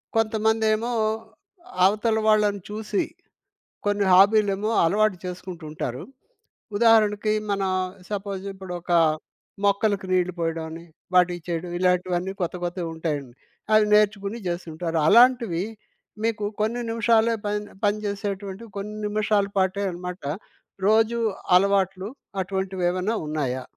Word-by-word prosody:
కొంతమందేమో 220 +1 +1 0.9
అవతల 215 +3 +2
వాళ్ళని 210 -2 +3
చూసి, 210 -1 -1 0.8
కొన్ని 205 -1 +1
హాబీలేమో 205 +2 +4
అలవాటు 210 +2 +2
చేసుకుంటుంటారు. 165 -8 -6 0.7
ఉదాహరణకి, 215 -2 +4 0.2
మన 195 -1 0 0.5
సపోజిప్పుడొక 195 -3 -5 0.8
మొక్కలకి 200 -1 +1
నీళ్ళు 180 0 +2
పోయడమని, 165 0 -3 0.3
వాటిచ్చేయడం, 175 -1 +1
ఇలాంటివన్నీ 180 0 +1
కొత్త 175 0 -2
కొత్తగా 175 0 -3
ఉంటాయండి. 145 -6 -3 0.4
అవి 215 0 +6
నేర్చుకొని 210 0 +2
జేస్తుంటారు. 170 -1 -3
అలాంటివి 235 -5 +5 0.6
మీకు 225 -2 0 0.2
కొన్ని 235 +3 0
నిమిషాలే 230 0 +3
పని 210 0 -1 0.2
పని 205 0 +2
జేసేటువంటి 200 0 -4
కొన్ని 210 +2 -5
నిమిషాల 210 -1 +1
పాటే 190 +1 +1
అనమాట. 180 0 -7 0.6
రోజు 225 +2 +3 0.4
అలవాట్లు 195 0 +2 0.3
అటువంటివేమైనా 185 +1 -1
ఉన్నాయా? 135 -4 -2
200 Hz, 95 wpm, -24 LUFS, 180-215 Hz, 0.9 s, అవి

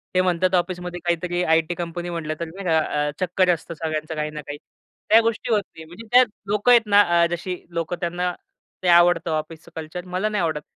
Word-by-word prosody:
ते 185 - +5
म्हणतात 185 0 +1
ऑफिसमध्ये 180 0 -2
काहीतरी, 175 +1 0
आई 160 -1 +4
टी 175 - -2
कंपनी 175 0 -5
म्हटलं 165 -3 -3
तर 170 - -2
नाही 185 +4 -9
का 160 -1 +3
अ, 150 -1 -1
चक्कर 185 0 +1
असतं 170 0 -6
सगळ्यांचं 155 0 -4
काही 150 0 -2
ना 150 0 -6
काही. 145 0 -7 0.5
त्या 220 - +8
गोष्टी 230 +1 -2
होत 210 - +4 0.2
नाही, 160 - -10
म्हणजे 175 +8 -12
त्यात 250 +1 +7 0.2
लोक 210 +4 +1
आहेत 240 -1 +8
ना, 205 -1 +6 0.2
अ, - - +5
जशी 175 +2 -3 0.2
लोकं 170 +1 -2
त्यांना, 175 +1 -1 0.5
ते - - 0
आवडतं 175 -1 +5
ऑफिसच 155 0 -4
कल्चर 160 +3 -6
मला 185 +4 -1
नाही 210 -2 -1
आवडत. 155 -2 -1
175 Hz, 210 wpm, -23 LUFS, 160-185 Hz, 0.5 s, त्या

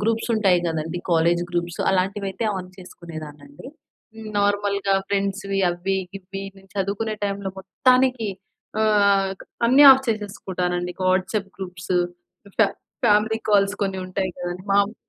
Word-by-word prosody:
Groups 225 +3 0
ఉంటాయి 200 -5 +3
గదండీ 160 +1 -2
college 170 +1 +3
groups 175 0 -2
అలాంటివైయితే 195 +2 -1
on 185 -1 -6
చేసుకునేదాన్నండి. 155 - -10 0.5
హ్మ్. 220 0 -9
నార్మల్‌గా 200 -1 +1
ఫ్రెండ్స్‌వి 195 0 -1
అవ్వి, 185 +3 -2 0.2
గివ్వి 195 0 -7
నేను 195 0 -18
చదువుకునే 200 +3 -1
టైంలో 200 -1 -2
మొత్తానికి 250 +3 +2 0.5
ఆహ్, 200 -2 +3
క్ - - -10 0.2
అన్నీ 265 +5 +7
ఆఫ్ 265 0 0
చేసేసుకుంటానండి. 185 -4 -2
ఇంక 185 - -7
వాట్సాప్ 190 +2 0
గ్రూప్సు 180 -1 -4 0.6
ఫా 220 - +6 0.4
ఫ్యామిలీ 215 +1 +3
కాల్స్ 200 -1 +4
కొన్ని 190 -1 -1
ఉంటాయి 185 0 -2
కదండీ. 180 +2 -5
మామ్ 200 +2 +2
195 Hz, 125 wpm, -23 LUFS, 180-205 Hz, 0.6 s, అన్నీ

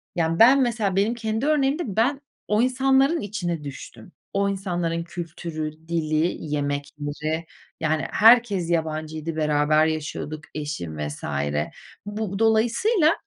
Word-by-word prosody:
yani, 165 -1 0
ben 260 +4 +7
mesela 225 -6 0
benim 205 +4 +2
kendi 220 +1 -2
örneğimde 295 +1 +2
ben 235 +7 +1 0.3
o 210 +1 +2
insanların 270 +5 +3
içine 175 -6 -3
düştüm. 140 +5 -9 0.2
O 200 0 +1
insanların 175 -4 -2
kültürü, 165 -2 -5 0.2
dili, 160 0 0
yemekleri, 145 +2 -3 0.3
yani, 160 -1 0
herkes 220 -5 +5
yabancıydı, 160 -1 -2
beraber 155 0 +3
yaşıyorduk, 155 -1 -3
eşim 145 - -4
vs. 75 0 -5 0.8
Bu 205 -1 -4
dolayısıyla 240 - +3
175 Hz, 115 wpm, -24 LUFS, 155-225 Hz, 0.8 s, ben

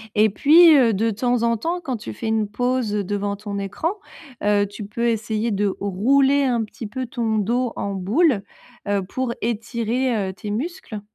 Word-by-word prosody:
et 215 +1 +5
puis 320 - +7
heu, 235 -4 +4
de 225 +4 +1
temps 245 +2 0
en 230 -1 +2
temps, 345 +8 -2
quand 265 -7 -3
tu 110 - -7
fais 220 - -5
une 220 -1 +1
pause 245 0 -1
devant 205 0 -2
ton 200 -1 -5
écran, 315 - -2 0.5
heu, 205 0 +3
tu 205 +1 -8
peux 235 +4 -2
essayer 225 0 -1
de 205 +1 +1
rouler 270 +9 +3
un 240 -3 +1
petit 215 +1 -8
peu 260 +3 -4
ton 230 -3 -1
dos 235 +4 0
en 200 0 -3
boule, 210 - +2 0.4
heu, 200 -1 0
pour 240 +5 -3
étirer, 230 -1 -1
heu, - - -6
tes 205 +1 -6
muscles. 250 - -5
225 Hz, 185 wpm, -22 LUFS, 205-255 Hz, 0.5 s, puis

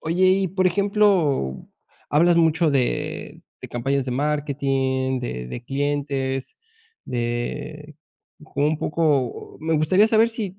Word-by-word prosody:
Oye 175 +3 +1
y 190 0 +2
por 185 +1 +1
ejemplo, 185 - +1 0.4
hablas 170 +4 +4
mucho 165 -1 +3
de 130 -3 -2 0.2
de - - -8
campañas 135 +3 -1
de 130 - -4
marketing, 135 -2 -1
de 60 - -5
de 120 - -7
clientes, 135 -1 -2 0.5
de 145 +6 -4 0.5
un 150 0 -1
poco 150 -7 -1
o - - -22
me 160 +1 0
gustaría 185 +8 +4
saber 225 +1 +4
si 210 -5 -5
150 Hz, 125 wpm, -23 LUFS, 130-170 Hz, 0.5 s, hablas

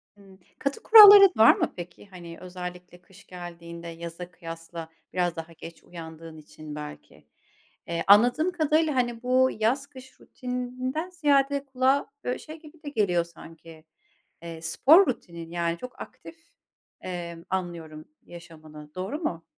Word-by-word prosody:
Hıı. 195 -2 -18 0.2
Katı 280 +10 -3
kuralların 410 -3 +10
var 220 +1 +7
mı - - -2
peki? 180 +3 -10
Hani 175 -3 -11
özellikle 180 -1 -9
kış 190 +2 -19
geldiğinde 170 -1 -10
yaza 170 +1 -8
kıyasla 165 -1 -9 0.2
biraz 175 -2 0
daha 165 0 -8
geç 165 +1 -12
uyandığın 165 -1 -11
için 150 0 -11
belki. 150 0 -11 0.6
Eee, 170 0 -3
anladığım 245 - +5
kadarıyla, 310 -3 +1
hani, 240 -1 -1
bu 255 +1 +3
yaz 265 +6 0
kış 265 -2 -15
rutininden 255 +6 -5
ziyade 285 -4 +1
kulağa 270 +1 0
böyle 250 - -3
şey 310 +1 -11
gibi 310 0 -17
de 290 - -5
geliyor 190 -9 +1
sanki, 165 -1 -15 0.6
eee, 165 -1 -8
spor 305 - +5
rutinin 170 -8 -6
yani 170 -1 -2
çok 250 +4 -10
aktif, 325 - -11 0.7
emm, 170 -2 -7
anlıyorum 170 -4 -5 0.2
yaşamını. 155 -3 -13
Doğru 195 - -4
mu? 170 - -4
180 Hz, 140 wpm, -26 LUFS, 170-260 Hz, 0.7 s, kuralların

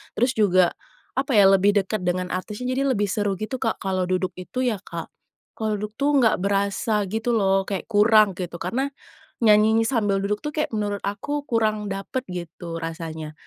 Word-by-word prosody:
terus 245 +3 +2
juga, 185 -4 +4 0.4
apa 275 +1 0
ya, 200 - +8
lebih 195 +1 +4
dekat 210 +1 -3
dengan 180 0 -1
artisnya, 220 +7 -4
jadi 275 - +1
lebih 205 -2 0
seru 205 0 0
gitu, 215 +5 -3
Kak. 225 - -1
Kalau 185 -1 -1
duduk 185 0 0
itu 215 +8 -6
ya 235 - +1
Kak, - - -7 0.5
kalau 215 -1 -1
duduk 210 +1 -5
tuh 290 +1 +2
enggak 230 -4 +4
berasa 200 +2 0
gitu 225 +3 -1
loh, 195 -2 +2
kayak 195 -3 -3
kurang, 210 -1 +5
gitu. 175 -2 -5
Karena 265 +9 -2 0.6
nyanyinya 220 +1 +5
sambil 210 -6 +1
duduk 210 +1 -1
tuh - - 0
kayak, 305 - -1
menurut 205 -1 -2
aku 285 +9 -3
kurang 215 -5 0
dapet 195 +6 -4
gitu, 170 -1 -6
rasanya. 160 -2 -6
205 Hz, 180 wpm, -24 LUFS, 190-225 Hz, 0.6 s, ya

